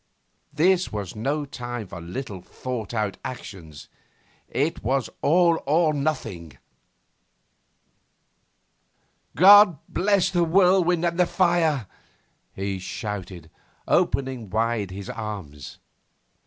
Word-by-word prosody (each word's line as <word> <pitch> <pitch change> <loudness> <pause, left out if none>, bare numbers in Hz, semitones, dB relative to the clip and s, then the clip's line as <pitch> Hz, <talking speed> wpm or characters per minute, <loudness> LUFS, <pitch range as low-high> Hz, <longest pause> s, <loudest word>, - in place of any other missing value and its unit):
This 180 +3 +2
was 105 -4 -5
no 145 +7 -2
time 120 -4 -6
for 85 -2 -9
little 95 +2 -6
thought 120 +2 -6
out 105 -4 -2
actions. 85 - -9 0.6
It 145 +7 -1
was 130 +2 -1
all 170 +1 +3
or 155 +1 +3
nothing! 130 - -3 2.8
'God 195 0 +8
bless 200 0 +1
the 175 -2 +2
whirlwind 180 0 +3
and 170 +1 -1
the 180 - +4
fire!' 170 - +1 0.7
he 95 0 -4
shouted, 95 -4 -6 0.4
opening 130 -6 0
wide 110 -1 -1
his 95 +1 -8
arms. 95 - -7
125 Hz, 100 wpm, -24 LUFS, -, 2.8 s, God